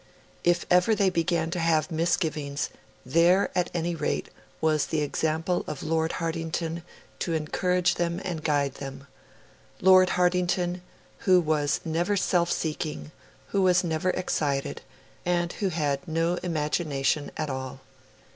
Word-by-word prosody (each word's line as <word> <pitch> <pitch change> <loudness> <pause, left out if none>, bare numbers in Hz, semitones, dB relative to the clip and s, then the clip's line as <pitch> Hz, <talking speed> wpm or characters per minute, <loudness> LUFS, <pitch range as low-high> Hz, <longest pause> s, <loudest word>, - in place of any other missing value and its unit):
If 175 0 +2
ever 180 +5 +5
they 195 -3 +2
began 165 -1 0
to 175 - -2
have 165 +1 +2
misgivings, 155 -4 -1 0.4
there, 170 +8 +4
at 180 -1 +1
any 170 0 -1
rate, 155 -3 -2 0.3
was 155 -2 +2
the 155 - 0
example 160 +4 0
of 150 -3 -5
Lord 160 +1 0
Hartington 165 0 -3 0.4
to 170 - -1
encourage 180 +4 +1
them 170 0 -1
and 170 -4 -3
guide 145 -3 +1
them 135 0 -7 0.7
Lord 185 0 +6
Hartington 180 0 +1 0.4
who 185 -1 +5
was 155 -3 +1
never 175 +5 0
self 175 -2 +2
seeking, 75 - -3 0.4
who 200 - +1
was 185 -1 +4
never 165 +1 0
excited, 145 -7 -1 0.4
and 175 -1 0
who 200 - -1
had 145 -5 -1
no 165 +2 +1
imagination 150 -3 0
at 155 -2 -2
all. 130 0 -5
165 Hz, 135 wpm, -27 LUFS, 150-180 Hz, 0.7 s, Lord